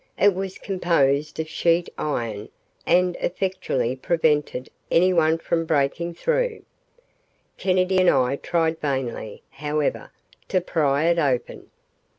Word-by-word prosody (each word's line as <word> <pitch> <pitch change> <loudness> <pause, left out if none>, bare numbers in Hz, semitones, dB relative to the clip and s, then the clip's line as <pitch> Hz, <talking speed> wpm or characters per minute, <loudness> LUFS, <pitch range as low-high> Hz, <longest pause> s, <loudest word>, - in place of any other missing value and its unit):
It 205 -1 +5
was 190 0 -5
composed 155 -6 0
of 160 - -2
sheet 170 +2 +1
iron 115 -7 -3 0.4
and 180 +1 +3
effectually 175 -9 -1
prevented 150 -3 0 0.2
anyone 165 -2 +3
from 165 0 -1
breaking 160 +3 0
through. - - -1 1.0
Kennedy 185 0 +2
and 185 -1 +5
I 130 +1 +2
tried 165 0 0
vainly, 130 -7 -3
however, 150 +1 -2 0.4
to 185 - +2
pry 150 -5 +1
it 170 0 +3
open. 135 -6 -1
165 Hz, 115 wpm, -23 LUFS, 140-180 Hz, 1.0 s, It